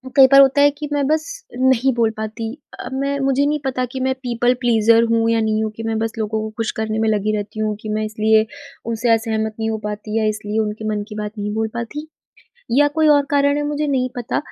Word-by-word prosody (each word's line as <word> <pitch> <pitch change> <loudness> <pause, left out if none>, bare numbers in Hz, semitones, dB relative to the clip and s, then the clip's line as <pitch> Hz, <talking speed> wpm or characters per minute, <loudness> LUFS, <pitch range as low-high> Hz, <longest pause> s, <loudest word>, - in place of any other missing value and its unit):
कई 270 -1 +8
बार 275 +1 +8
होता 275 +1 +4
है 290 - +7
कि 295 0 -5
मैं 285 -1 +1
बस 310 +1 +1 0.3
नहीं 260 0 +3
बोल 230 -2 +2
पाती 220 +1 -5 0.3
अ, - - -6
मैं 275 +1 -1
मुझे 275 +1 +2
नहीं 300 +1 0
पता 255 -1 -1
कि 265 - -5
मैं 260 - +1
पीपल 245 0 +1
प्लीज़र 230 -1 +4
हूँ 230 0 +2
या 230 0 +2
नहीं 220 0 0
हूँ, 215 - -2
कि 225 - -7
मैं 225 0 -1
बस 225 0 -1
लोगों 220 0 -2
को 220 - -4
ख़ुश 225 -1 -1
करने 220 0 -1
में 220 - +1
लगी 215 0 0
रहती 210 +1 -5
हूँ, 215 -1 -1
कि 215 - -6
मैं 215 0 -1
इसलिए 215 0 +2 0.4
उनसे 230 +1 -1
असहमत 220 -1 -1
नहीं 220 - -1
हो 220 - -1
पाती 210 +1 -4
या 220 - +1
इसलिए 215 0 -3
उनके 215 0 -3
मन 210 -1 -2
की 210 - -8
बात 210 0 -4
नहीं 210 0 -3
बोल 220 0 -1
पाती 235 +7 -5 0.7
या 290 0 +5
कोई 315 -1 +3
और 285 - +2
कारण 285 0 +3
है 295 - -1
मुझे 295 +1 -1
नहीं 260 -3 0
पता। 240 -1 -2
225 Hz, 245 wpm, -20 LUFS, 215-270 Hz, 0.7 s, कई